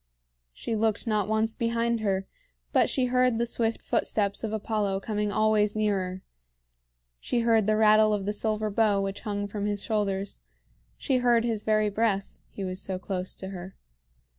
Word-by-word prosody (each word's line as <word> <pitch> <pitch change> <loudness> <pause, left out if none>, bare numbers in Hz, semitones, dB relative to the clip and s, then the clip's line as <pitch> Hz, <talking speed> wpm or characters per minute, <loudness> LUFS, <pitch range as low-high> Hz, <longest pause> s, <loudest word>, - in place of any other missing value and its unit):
She 220 - -4
looked 220 0 0
not 210 -3 0
once 220 +1 +1
behind 235 0 0
her, 195 -3 -1 0.5
but - - +4
she 260 - +1
heard 250 -1 +2
the 235 - +1
swift 230 -1 -1
footsteps 200 -1 0
of 220 - -2
Apollo 210 -2 -1
coming 210 -1 -2
always 215 -1 +2
nearer; 190 -3 -1 1.0
she 235 - -1
heard 225 -3 +3
the 215 - +3
rattle 215 0 +5
of 205 -2 -1
the 210 - -1
silver 215 0 -1
bow 205 -1 +2
which 195 0 -3
hung 205 -2 -3
from 205 0 -3
his 205 -1 -2
shoulders; 200 - -2 0.6
she 265 - 0
heard 240 -2 +3
his 225 -3 -1
very 215 -1 +1
breath, 200 -2 -1
he 200 - -7
was 185 0 -4
so 190 -1 -3
close 185 0 -4
to 190 - -7
her. 190 0 -8
210 Hz, 170 wpm, -27 LUFS, 200-225 Hz, 1.0 s, rattle